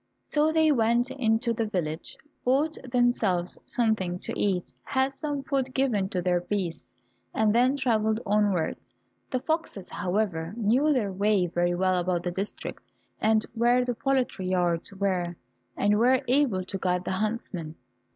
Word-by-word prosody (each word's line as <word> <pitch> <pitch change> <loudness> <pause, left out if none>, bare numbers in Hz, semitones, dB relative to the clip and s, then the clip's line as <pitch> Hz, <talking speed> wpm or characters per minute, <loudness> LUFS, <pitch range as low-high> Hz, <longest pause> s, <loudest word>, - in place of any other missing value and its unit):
So 300 +1 +2
they 315 -1 +4
went 240 0 +2
into 235 -2 +1
the 225 -1 -1
village, 165 -5 -3 0.3
bought 285 +5 +2 0.2
themselves 220 -8 +1
something 215 -7 0
to - - -5
eat, 185 -3 -1
had 265 0 0
some 285 0 -3
food 265 -1 -1
given 225 -8 +1
to 180 -2 -2
their 180 -1 +2
beasts, 175 -4 -3 0.5
and 215 -1 +3
then 250 +4 +3
travelled 220 -4 +1
onwards. 205 -5 +1 0.5
The 255 - -1
foxes, 315 - -3
however, 180 -2 -1
knew 240 +7 +3
their 230 -8 +1
way 200 -1 +2
very 175 0 0
well 185 0 +2
about 175 -1 -1
the 175 - -2
district 195 +4 -5 0.4
and 220 0 +3
where 240 +2 +3
the 245 - -1
poultry 250 -6 -1
yards 175 -2 0
were, 185 -3 -1 0.4
and 205 +1 +3
were 255 +3 +4
able 250 -8 +2
to 195 +1 -5
guide 180 -1 0
the - - -2
huntsmen. 185 -6 -3
215 Hz, 150 wpm, -27 LUFS, 185-250 Hz, 0.5 s, they